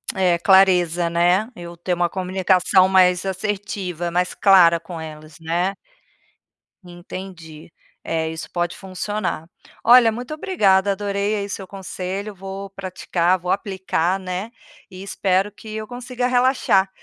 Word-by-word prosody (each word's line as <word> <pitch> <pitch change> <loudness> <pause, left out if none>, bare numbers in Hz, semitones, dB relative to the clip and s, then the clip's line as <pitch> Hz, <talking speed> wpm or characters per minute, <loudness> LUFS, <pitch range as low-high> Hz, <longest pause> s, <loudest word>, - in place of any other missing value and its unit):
É 180 -3 +2
clareza, 180 -3 +4
né. 175 +6 +2
Eu 175 -4 -9
ter 175 +2 -2
uma 175 0 0
comunicação 185 0 +2
mais 180 -1 +4
assertiva, 190 -3 -3
mais 180 +1 0
clara 180 -4 +5
com 165 0 -9
elas, 155 -1 -10
né. 175 +4 -1 1.1
Entendi, 175 -3 -10 0.3
é 160 -1 -2
isso 160 0 -7
pode 175 -1 -2
funcionar. 185 -3 -4 0.3
Olha 235 -1 +7
muito 245 +6 -6
obrigada 200 - +2
adorei, 200 +1 -1
aí, 200 -1 -3
seu 195 -1 -6
conselho, 195 +2 -6
vou 195 +1 -7
praticar, 185 -2 -1
vou 180 +1 -3
aplicar, 190 -2 -1
né, 185 +4 -5 0.4
e 185 -1 -10
espero 195 0 0
que 215 +2 -10
eu 215 -1 -5
consiga 245 0 -3
relaxar, 250 -6 +2
190 Hz, 130 wpm, -21 LUFS, 175-200 Hz, 1.1 s, Olha